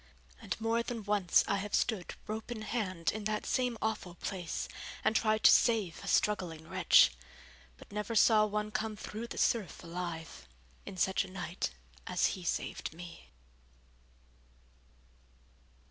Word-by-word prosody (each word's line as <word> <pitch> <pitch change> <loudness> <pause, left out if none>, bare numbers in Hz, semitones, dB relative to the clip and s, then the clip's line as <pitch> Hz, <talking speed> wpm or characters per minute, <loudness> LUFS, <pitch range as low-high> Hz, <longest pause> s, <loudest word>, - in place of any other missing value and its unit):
And - - -4
more 225 +1 +1
than 235 -2 -4
once 205 -3 +3
I 200 - +1
have 200 +1 -2
stood 210 -7 0
rope 220 +1 -5
in 225 -3 -5
hand 185 -7 -1
in 215 -1 -6
that 215 0 -1
same 250 -2 0
awful 215 -5 -2
place, 175 -2 -4 0.4
and 220 - +2
tried 215 -1 +2
to - - +9
save 220 -8 +3
a - - -8
struggling 170 -6 +1
wretch; 70 - +6 0.7
but - - -15
never 210 +2 -3
saw 215 0 +6
one 210 0 -2
come 215 0 -2
through 220 +2 -6
the - - -8
surf 215 -7 0
alive, 170 - -6 0.4
in 195 - -7
such 190 +2 +2
a 195 - -10
night 180 -2 -3 0.4
as - - +2
he 185 - -7
saved 170 - -3
me. 175 0 -10
210 Hz, 145 wpm, -32 LUFS, 180-220 Hz, 0.7 s, to